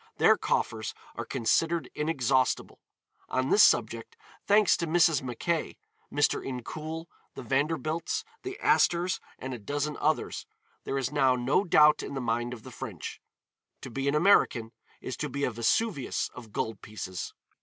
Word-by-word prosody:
Their - - +6
coffers 110 -2 -1 0.2
are - - -4
considered 165 +8 +1
inexhaustible. 135 -5 0 0.5
On 130 +1 0
this 210 - +6
subject, 115 -1 +3 0.3
thanks 205 -4 +5
to 170 - -2
Mrs. 165 -2 +4
Mackay, 135 +6 -2 0.3
Mr. 145 0 +1
Incoul, 155 +6 -5 0.3
the - - -7
Vanderbilts, 155 - -1 0.2
the 385 +1 -6
Astors 175 +2 +3 0.2
and 130 0 -6
a 120 - -6
dozen 145 +6 -3
others, 155 +1 -1 0.4
there 135 - -2
is 135 0 -1
now 135 -3 +3
no 130 +9 +2
doubt 150 -5 +5
in - - -6
the - - -2
mind 120 0 -1
of 120 -3 -8
the - - -10
French. - - -7 0.6
To 130 - -8
be 135 +3 -2
an 140 - +2
American 150 - +3 0.3
is 130 - -5
to 150 - -3
be 140 +2 -3
a 125 - +1
Vesuvius 135 - 0
of 115 -4 -11
gold 110 0 -3
pieces. 95 -3 -6
140 Hz, 155 wpm, -28 LUFS, 120-160 Hz, 0.6 s, Their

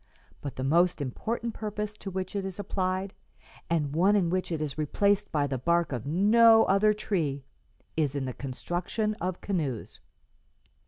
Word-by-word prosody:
But 140 - -6
the 130 - -4
most 170 +6 +3
important 225 - -3
purpose 210 -1 -4
to 195 - -6
which 190 +1 -4
it 200 - -1
is 190 -1 -5
applied, 190 -1 -2 0.6
and 150 -4 0
one 190 +6 +4
in 175 -5 +2
which 185 -1 -1
it 160 - -1
is 150 -3 -3
replaced 200 +7 +1
by 150 -3 +1
the 135 -2 -2
bark 170 +4 +1
of 125 -1 -4
no 225 +7 +6
other 200 +2 +4
tree, 165 -10 -1 0.5
is 145 -3 0
in 140 -2 -1
the 130 - -4
construction 175 - -3
of 180 0 -3
canoes. 150 - -3
180 Hz, 165 wpm, -28 LUFS, 145-205 Hz, 0.6 s, no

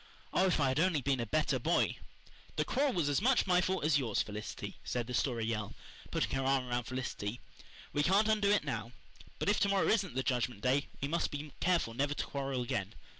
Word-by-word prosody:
Oh, 190 - +4
if 180 - +2
I 140 -2 +3
had 130 - 0
only 170 -2 +3
been 135 -1 +1
a 115 - -2
better 150 -1 +1
boy! 165 +8 +1 0.6
"The - - +1
quarrel 275 +1 +1
was 170 -5 +1
as 145 +4 +1
much 255 +3 +3
my 180 -2 +4
fault 185 -1 -1
as 150 -2 +4
yours, 115 -6 0
Felicity," 105 0 -6
said 120 -1 -2
the 125 - -6
Story 120 -2 0
Girl, 105 -3 -3 0.3
putting - - -1
her 135 - 0
arm 135 -1 +2
around 120 -1 -1
Felicity. 125 -3 -4 0.5
"We 145 - +2
can't 195 +7 +4
undo 210 -2 +3
it 205 -4 +3
now. 115 -4 -4 0.4
But - - -3
if 205 - +3
to 200 - +2
morrow 195 -1 +2
isn't 195 - +1
the 130 - 0
Judgment 120 -5 -1
Day 135 +4 +2
we 140 - 0
must 170 +3 0
be 145 0 -6
careful 170 -10 +1
never 145 +4 0
to - - -2
quarrel 135 -2 -2
again. 105 -3 -3
140 Hz, 225 wpm, -33 LUFS, 120-180 Hz, 0.6 s, Oh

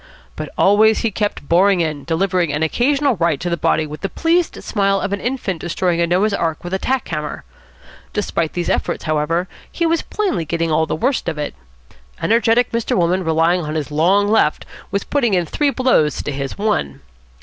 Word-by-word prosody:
But - - -5
always 215 +2 +4
he 230 - 0
kept 205 -8 -3
boring 185 +2 +4
in, 155 -4 -2
delivering 175 -1 0
an 150 +2 -1
occasional 270 - +1
right 165 -4 +1
to 175 - -3
the - - +2
body 160 -1 +1
with 150 0 -8
the 195 - -2
pleased 335 - 0
smile 195 -2 +1
of 195 - -2
an 200 - -3
infant 235 -10 -3
destroying 175 0 0
a 170 - +2
Noah's 190 +5 +2
Ark 165 -4 -2
with 175 +1 -6
a 190 - 0
tack 260 +2 -1
hammer. 150 -2 -4 0.7
Despite 170 -6 -2
these 175 -1 -2
efforts, - - -1
however, 160 +3 0 0.2
he 335 - -1
was 330 0 +2
plainly 390 - -2
getting 165 +1 -1
all 160 +1 +2
the - - -1
worst 245 - 0
of 160 - -5
it. 150 -1 -3 0.7
Energetic 230 +2 +2
Mr. 230 -1 -1
Wolmann, 180 +1 +1
relying 165 +2 +2
on 155 0 -4
his 150 -1 -3
long 185 +7 +3
left, 205 -8 +2 0.2
was 200 - -1
putting 240 -8 +1
in 175 -1 +1
three 290 - 0
blows 255 - +1
to - - -3
his 135 -1 -4
one. 70 - -1
180 Hz, 195 wpm, -19 LUFS, 160-220 Hz, 0.7 s, always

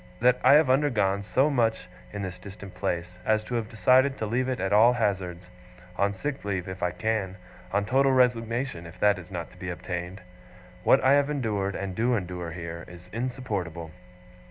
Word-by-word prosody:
"that 125 +1 +4
I 130 - +7
have 150 0 +6
undergone 120 -8 +2
so 130 +8 +2
much 115 -4 +1 0.2
in 100 -1 -5
this 90 -1 -6
distant 100 -1 -10
place, 90 +1 -3
as 110 -1 +2
to 120 - -7
have 115 -2 -1
decided 130 +4 +3
to 110 - -2
leave 125 +4 0
it 130 - -2
at 95 +1 -1
all 115 +4 +6
hazards; 95 -6 -2 0.5
on 100 +1 +1
sick 145 +6 -4
leave, 95 -3 -2
if 95 0 -7
I 90 - +1
can; 100 -2 -2 0.3
on 100 +1 +1
total 135 +4 +3
resignation, 120 -6 +1
if 85 +2 -13
that 105 -2 +3
is 90 - -12
not 85 -4 -6
to - - -18
be 90 - -5
obtained. 90 +1 -5 0.6
What 135 - +5
I 130 - +5
have 145 0 +3
endured, 105 -9 -1
and 95 -1 -4
do 120 +5 +1
endure 90 -4 -4
here, 85 -1 -6
is 90 0 -13
insupportable." 105 - -4
105 Hz, 190 wpm, -27 LUFS, 90-125 Hz, 0.6 s, I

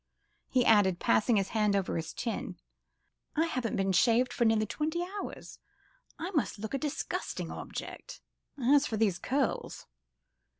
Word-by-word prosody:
he 250 -2 +2
added, 200 -5 +5
passing 225 +2 +3
his 195 -1 0
hand 210 -2 +2
over 195 -2 0
his 165 0 -3
chin, 230 - -4 0.8
"I 320 +2 +3
haven't 255 -8 -2
been 195 0 +1
shaved 235 +6 +3
for 235 - +1
nearly 220 -1 +3
twenty 310 - -2 0.2
hours: - - -8 0.6
I 350 +4 -4
must 295 - 0
look 220 +4 -6
a 275 - 0
disgusting 295 -1 -3
object. - - -7 0.4
As 280 +3 +4
for 220 - -2
these 205 -5 +2
curls 270 -1 -1
230 Hz, 145 wpm, -30 LUFS, 205-275 Hz, 0.8 s, added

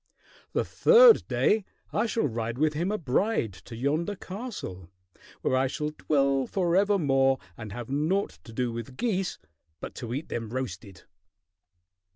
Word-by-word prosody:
"The - - +1
third 475 -1 +6
day 215 0 +2 0.3
I 215 +3 +1
shall 225 +1 0
ride 115 -1 -3
with 155 +2 +2
him 170 +6 -1
a 215 - 0
bride 150 - 0
to 115 - -11
yonder 155 - -1
castle, 185 - -7 0.5
where - - +2
I 130 +1 +2
shall 150 +3 -3
dwell 140 -3 +1
forevermore 170 -8 +2 0.2
and 110 +1 -8
have 120 +4 -6
naught 155 - 0
to - - -11
do 120 +1 -1
with 115 +3 -7
geese 195 -6 -1 0.4
but - - -7
to 120 - -5
eat 150 +4 -5
them 115 -2 -4
roasted!" 105 -6 -6
140 Hz, 150 wpm, -27 LUFS, 120-195 Hz, 0.5 s, third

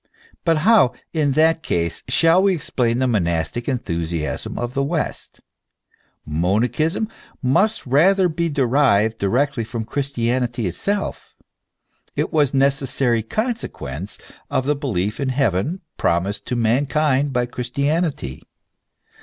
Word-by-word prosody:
But 165 -3 +3
how, 220 - +5 0.2
in 150 -4 +1
that 160 +2 +3
case, 85 - -1
shall 165 +7 +4
we 195 -1 +3
explain 120 -6 0
the 130 - +1
monastic 95 - -1
enthusiasm 85 - -3
of 120 +1 -3
the 135 - 0
west? 150 +3 -3 0.8
Monachism 110 - 0 0.4
must 195 - +2
rather 180 +9 +4
be 170 0 -1
derived 125 -6 +2
directly 125 +5 +1
from 115 0 -5
Christianity 120 -2 -1
itself: 200 - -3 0.8
it - - -1
was 145 -4 +3
a 135 - -1
necessary 135 -3 +2
consequence 110 - -4 0.3
of 130 - 0
the 150 +1 +2
belief 105 - -2
in 135 -2 -1
heaven, 130 - 0 0.2
promised 95 +5 0
to 125 - -1
mankind 135 +4 +1
by 125 -2 +1
Christianity. 140 - -2
130 Hz, 120 wpm, -21 LUFS, 110-155 Hz, 0.8 s, how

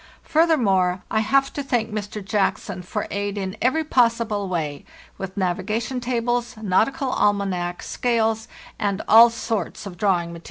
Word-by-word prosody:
| - - -33
Further 325 0 +3
more, 190 -6 +1
I 220 - +2
have 275 +5 +2
to 285 - -3
thank 240 -5 -1
Mr. 210 -1 -5
Jackson 200 -2 -1
for 180 - -4
aid 200 0 -2
in 190 0 -3
every 285 +7 +2
possible 230 -7 +1
way, 155 -5 -3 0.4
with 195 +1 -6
navigation 210 +7 -1
tables, 240 -1 -1
nautical 220 - +1
almanac,* 190 -5 0
scales, 225 -2 0 0.3
and 200 -1 -1
all 230 +2 +9
sorts 225 -4 -4
of 185 -3 -8
drawing 175 -3 +1
material. 170 - -8
210 Hz, 155 wpm, -23 LUFS, 190-240 Hz, 0.4 s, all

